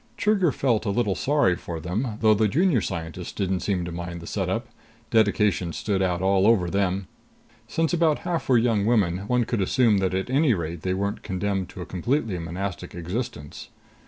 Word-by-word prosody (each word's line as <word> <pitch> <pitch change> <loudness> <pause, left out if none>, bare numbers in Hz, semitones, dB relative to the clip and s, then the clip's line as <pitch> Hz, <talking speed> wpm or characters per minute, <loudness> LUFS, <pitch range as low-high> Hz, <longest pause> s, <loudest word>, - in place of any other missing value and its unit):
Trigger 200 -6 +2
felt 120 -5 0
a - - +2
little 105 -1 +1
sorry 140 -6 +2
for 85 -1 -6
them, 105 - -3
though 110 -1 +6
the 110 +1 +2
Junior 155 - +2
Scientists 85 -1 -5
didn't 95 -2 -1
seem 90 -3 -1
to 85 - -5
mind 85 0 -5
the 85 - -10
setup. - - -2 0.5
Dedication 105 -5 +2
stood 100 -3 -1
out 90 -1 0
all 95 +1 +3
over 95 -7 +3
them. 100 -1 0 0.6
Since 165 +1 0
about 165 -3 +3
half 170 -5 -2
were 125 - +6
young 115 -3 +2
women, 100 -7 +2
one 125 0 +2
could 115 -3 -1
assume 110 +1 +3
that 95 -1 0
at 95 - -1
any 135 -3 +3
rate 85 -1 -4
they 95 +1 -1
weren't 100 +1 -2
condemned 95 -1 -2
to 95 - -9
a - - -8
completely 110 - -1
monastic 90 +3 -5
existence. 85 - -5
100 Hz, 190 wpm, -25 LUFS, 90-120 Hz, 0.6 s, though